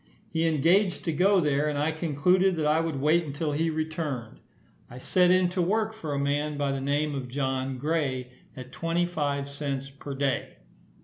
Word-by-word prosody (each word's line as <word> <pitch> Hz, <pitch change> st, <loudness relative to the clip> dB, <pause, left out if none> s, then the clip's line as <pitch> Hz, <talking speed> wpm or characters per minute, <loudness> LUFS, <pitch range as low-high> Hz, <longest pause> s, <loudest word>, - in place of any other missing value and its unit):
He 165 Hz, 0 st, +1 dB
engaged 170 Hz, +5 st, +2 dB
to 165 Hz, -, +1 dB
go 190 Hz, +5 st, +4 dB
there, 150 Hz, -2 st, +1 dB
and 145 Hz, -, -2 dB
I 150 Hz, +2 st, +1 dB
concluded 175 Hz, +4 st, +2 dB
that 155 Hz, -2 st, -1 dB
I 150 Hz, +1 st, +3 dB
would 165 Hz, -4 st, -2 dB
wait 155 Hz, +5 st, +3 dB
until 150 Hz, +1 st, -3 dB
he 160 Hz, +3 st, 0 dB
returned. 155 Hz, -7 st, -4 dB, 0.5 s
I 125 Hz, -, -10 dB
set 180 Hz, +7 st, +3 dB
in 185 Hz, 0 st, +4 dB
to 180 Hz, 0 st, -1 dB
work 215 Hz, +5 st, +1 dB
for 160 Hz, -9 st, -5 dB
a -, -, -1 dB
man 145 Hz, +1 st, -1 dB
by 140 Hz, -1 st, 0 dB
the 135 Hz, -1 st, -2 dB
name 145 Hz, +2 st, 0 dB
of 135 Hz, -2 st, -4 dB
John 130 Hz, 0 st, -2 dB
Gray, 135 Hz, -4 st, -1 dB, 0.3 s
at 130 Hz, 0 st, -9 dB
twenty 165 Hz, +4 st, 0 dB
five 145 Hz, -5 st, -2 dB
cents 140 Hz, -1 st, -4 dB
per 140 Hz, 0 st, -8 dB
day. 135 Hz, -2 st, -1 dB
150 Hz, 190 wpm, -27 LUFS, 140-165 Hz, 0.5 s, go